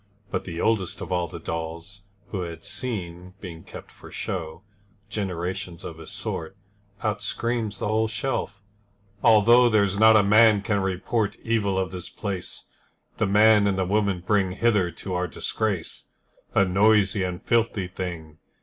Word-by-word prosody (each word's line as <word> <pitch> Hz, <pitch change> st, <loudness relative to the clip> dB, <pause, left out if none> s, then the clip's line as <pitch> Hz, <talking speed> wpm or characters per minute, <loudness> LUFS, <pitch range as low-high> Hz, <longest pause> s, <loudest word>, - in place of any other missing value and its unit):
But -, -, -2 dB
the 85 Hz, -2 st, -6 dB
oldest 105 Hz, -4 st, 0 dB
of -, -, -6 dB
all 90 Hz, -1 st, 0 dB
the 85 Hz, -, -8 dB
dolls 85 Hz, +5 st, -6 dB, 0.3 s
Who 95 Hz, -, -3 dB
had 85 Hz, -2 st, -7 dB
seen, 90 Hz, -6 st, -5 dB
being 85 Hz, -4 st, -9 dB
kept -, -, -11 dB
for -, -, -14 dB
show, 85 Hz, -1 st, -5 dB, 0.5 s
Generations 90 Hz, -3 st, -4 dB
of 80 Hz, -1 st, -8 dB
his 80 Hz, -, -9 dB
sort, 85 Hz, +4 st, -5 dB, 0.5 s
Out -, -, -1 dB
screams 115 Hz, -4 st, -2 dB
the -, -, -3 dB
whole 110 Hz, +1 st, +1 dB
shelf: 110 Hz, -4 st, -3 dB, 0.6 s
'Although 120 Hz, +2 st, +6 dB
There's 100 Hz, -3 st, +2 dB
not 110 Hz, 0 st, +7 dB
a 105 Hz, -, +5 dB
man 105 Hz, 0 st, +5 dB
can 100 Hz, -1 st, 0 dB
report 95 Hz, +3 st, -1 dB
Evil 105 Hz, -4 st, 0 dB
of 95 Hz, -1 st, -1 dB
this 90 Hz, -2 st, -6 dB
place, 100 Hz, -4 st, -5 dB, 0.5 s
The 110 Hz, -, +1 dB
man 105 Hz, +1 st, +5 dB
and 95 Hz, -1 st, 0 dB
the 95 Hz, -, +1 dB
woman 100 Hz, -2 st, 0 dB
bring 100 Hz, -3 st, +2 dB
Hither 105 Hz, -4 st, +2 dB
to 90 Hz, +3 st, -7 dB
our 90 Hz, 0 st, 0 dB
disgrace, 100 Hz, +1 st, -3 dB, 0.5 s
A 100 Hz, -, +5 dB
noisy 100 Hz, +1 st, +3 dB
and 90 Hz, -1 st, -2 dB
filthy 115 Hz, -5 st, 0 dB
thing.' 85 Hz, -4 st, -7 dB
100 Hz, 160 wpm, -25 LUFS, 90-110 Hz, 0.6 s, not